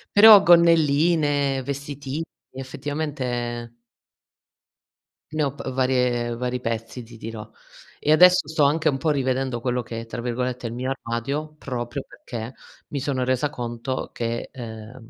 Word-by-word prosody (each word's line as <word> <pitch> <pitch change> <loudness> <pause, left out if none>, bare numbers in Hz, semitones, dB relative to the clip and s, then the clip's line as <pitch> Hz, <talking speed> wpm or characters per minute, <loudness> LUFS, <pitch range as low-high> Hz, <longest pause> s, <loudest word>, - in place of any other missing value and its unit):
Però 210 0 +10
gonnelline, 155 -4 +4
vestitini, 140 +2 -4 0.3
effettivamente 130 -3 -4 1.6
ne 155 -1 0
ho 140 - 0
pr 130 - -5
varie 125 -2 +1
vari 125 +1 -2
pezzi, 115 +1 -4
ti 115 0 -13
dirò. 110 -1 -7 0.5
E 150 - +1
adesso, 180 0 +6
sto 155 -1 +1
anche 155 +2 +2
un 135 - -1
po' 155 +3 -1
rivedendo 130 -3 0
quello 125 0 0
che 115 0 -6
è, - - -9
tra 115 +1 -6
virgolette, 125 0 -2
"il 115 - -6
mio 130 +2 -3
armadio" 135 +5 -3
proprio 125 -1 -4
perché, 115 0 -7 0.4
mi 140 - -3
sono 130 -2 -1
resa 130 +3 +1
conto 120 +1 -4
che, 115 0 -3
ehm, 115 -1 -9
130 Hz, 140 wpm, -24 LUFS, 120-145 Hz, 1.6 s, Però